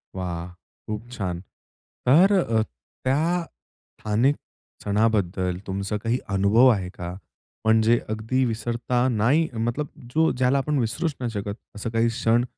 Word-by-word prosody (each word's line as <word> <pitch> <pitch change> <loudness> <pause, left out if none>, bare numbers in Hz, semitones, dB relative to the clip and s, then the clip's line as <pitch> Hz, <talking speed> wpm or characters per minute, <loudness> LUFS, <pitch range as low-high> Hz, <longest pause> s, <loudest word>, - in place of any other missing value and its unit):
वाह. 90 -2 -4 0.4
खूप 110 +2 -5
छान. 95 -8 -3 0.7
तर 175 +10 +6
अ, 115 - +2 0.4
त्या 160 +7 +1 0.6
स्थानिक 115 +7 +2 0.5
सणाबद्दल 100 -4 +1
तुमचा 100 +2 -2
काही 115 +2 +1 0.2
अनुभव 105 +6 +5
आहे 95 -6 +1
का? 90 -1 -7 0.5
म्हणजे 110 +1 +5
अगदी 110 +4 0
विसरता 120 +2 0
नाही 130 +8 +3
मतलब 120 +6 -1 0.3
जो 160 +1 +3
ज्याला 130 +2 +3
आपण 145 +2 0
विसरूच 145 +7 -1
नाही 125 -2 -2
शकत, 100 -1 -4 0.2
असं 105 +2 -4
काही 115 +1 +2
क्षण 115 0 +2
115 Hz, 130 wpm, -24 LUFS, 105-130 Hz, 0.7 s, तर